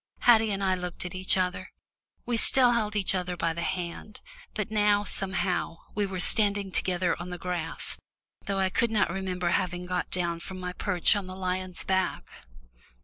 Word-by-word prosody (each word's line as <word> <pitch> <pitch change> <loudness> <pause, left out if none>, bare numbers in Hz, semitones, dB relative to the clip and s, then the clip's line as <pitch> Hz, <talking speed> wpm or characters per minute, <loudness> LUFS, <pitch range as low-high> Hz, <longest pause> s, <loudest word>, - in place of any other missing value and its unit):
Haddie 225 -2 +5
and 200 -1 -2
I 190 -1 +2
looked 180 -1 -4
at 180 - -5
each 185 +1 +3
other 180 -1 -2 0.5
we 240 - 0
still 245 +2 +6
held 215 -3 0
each 200 -2 +2
other 180 -1 -2
by 165 -1 0
the 170 - -5
hand, 180 +4 -4 0.4
but 215 -1 -3
now, 205 -1 +3
somehow, 185 -4 -2 0.2
we 205 -1 0
were 190 -1 -5
standing 200 0 +3
together 180 0 +1
on 175 - -6
the 180 - -5
grass, 175 -2 -2 0.5
though 200 -1 -1
I 190 -1 +2
could 235 - +2
not 215 -5 +1
remember 185 -1 -2
having 175 0 -1
got 180 0 -2
down 170 -2 -2
from 185 +2 -8
my 180 0 -4
perch 180 0 +2
on 200 -2 -3
the 185 0 -8
lion's 185 -1 -3
back. 190 -1 -1
185 Hz, 185 wpm, -28 LUFS, 180-205 Hz, 0.5 s, still